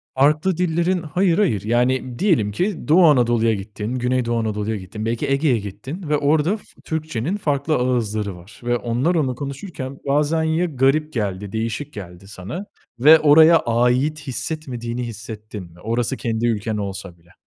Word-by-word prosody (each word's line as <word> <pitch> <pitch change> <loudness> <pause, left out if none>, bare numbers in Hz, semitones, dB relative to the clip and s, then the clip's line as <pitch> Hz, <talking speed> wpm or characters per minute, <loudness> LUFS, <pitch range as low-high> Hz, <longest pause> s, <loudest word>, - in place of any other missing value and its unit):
Farklı 150 +6 +3
dillerin 175 0 0
Hayır 170 +3 +1
hayır. 115 - +1
Yani 125 +2 0
diyelim 130 - +2
ki 180 - -2
Doğu 175 +4 +6
Anadolu'ya 120 -5 +3
gittin, 105 +3 -5
Güneydoğu 125 -2 0
Anadolu'ya 110 0 -2
gittin, 105 +3 -6
belki 115 0 -1
Ege'ye 135 -3 +2
gittin 120 - -7
ve 150 - +2
orada 150 +7 +2
f 215 - -17 0.2
Türkçe'nin 160 - -2
farklı 150 -5 0
ağızları 110 -6 -1
var 90 +5 -15
ve 120 0 +1
onlar 120 +9 0
onu 140 -6 +1
konuşurken 140 0 -6
bazen 150 +3 +2
ya 160 +2 +1
garip 150 0 +1
geldi, 100 -4 -3
değişik 115 +6 -3
geldi 90 -1 -10
sana 105 - -7 0.3
ve 155 +6 +8
oraya 160 +2 +7
ait 125 +6 +1
hissetmediğini 125 -3 -4
hissettin 110 -2 -8
mi? 85 - -17
Orası 115 +5 -1
kendi 115 -1 -1
ülken 110 -1 -1
olsa 95 -3 -6
bile. 85 +1 -24
125 Hz, 155 wpm, -21 LUFS, 110-155 Hz, 0.3 s, ve